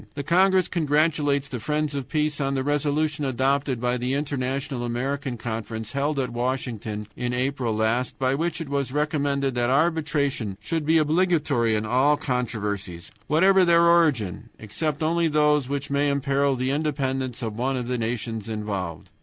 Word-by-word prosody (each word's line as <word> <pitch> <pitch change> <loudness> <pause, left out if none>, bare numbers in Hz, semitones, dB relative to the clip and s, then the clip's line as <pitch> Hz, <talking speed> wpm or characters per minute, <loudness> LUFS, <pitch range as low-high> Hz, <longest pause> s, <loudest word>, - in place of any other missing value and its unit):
The 145 - -3
congress 185 +3 +3
congratulates 150 -3 +1
the 130 -3 -5
friends 150 +4 -1
of 140 -3 -4
peace 150 -1 0
on 135 0 0
the 135 - 0
resolution 150 +1 0
adopted 135 0 0
by 125 +1 0
the 125 +2 -1
International 135 -2 -2
American 130 +2 -2
Conference, 110 0 -5
held 140 +2 -1
at 130 -3 -1
Washington 120 -4 -3
in 125 0 -2
April 130 -2 -1
last, 115 +3 0
by 130 0 +1
which 165 +5 -1
it 165 - -5
was 140 -2 -2
recommended 140 -2 0
that 120 0 0
arbitration 145 - 0
should 150 +8 -3
be 165 +1 +5
obligatory 155 -8 +2
in 105 0 -1
all 130 +6 +3
controversies, 105 - -3 0.2
whatever 190 +5 +5
their 170 -1 +5
origin, 145 - +2
except 150 +8 -3
only 165 +1 +2
those 150 -3 +2
which 140 0 -3
may 140 +1 +2
imperil 140 0 +1
the 130 +1 -1
independence 135 -4 -2
of 110 -2 -3
one 130 +3 -1
of 125 -1 -4
the 125 -1 -1
nations 115 -1 -3
involved. 100 -6 -4
135 Hz, 160 wpm, -24 LUFS, 120-150 Hz, 0.2 s, be